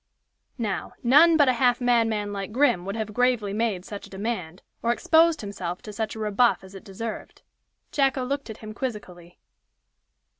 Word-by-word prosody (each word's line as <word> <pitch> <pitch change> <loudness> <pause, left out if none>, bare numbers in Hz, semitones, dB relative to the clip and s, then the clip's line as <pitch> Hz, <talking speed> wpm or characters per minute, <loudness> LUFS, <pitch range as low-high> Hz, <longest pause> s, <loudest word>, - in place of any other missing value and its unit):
Now, 215 -6 -3
none 305 +7 +6
but 290 -3 +5
a 255 - +4
half 245 0 +2
madman 225 -4 +1
like 195 0 -5
Grim 240 -7 +2
would 195 +2 -4
have 215 -1 -4
gravely 245 -4 +1
made 210 -4 -1
such 205 -1 -8
a - - -19
demand, 190 -4 -5 0.2
or 235 - +1
exposed 325 +3 +3
himself 185 -4 -5
to 210 - -8
such 220 +1 -3
a - - -7
rebuff 215 +2 +2
as 190 0 -13
it 195 - -10
deserved. 215 +3 -7 0.5
Jacko 270 -2 +1
looked 280 0 -3
at 220 - -7
him 215 - -7
quizzically. 185 -8 -7
220 Hz, 175 wpm, -25 LUFS, 200-250 Hz, 0.5 s, none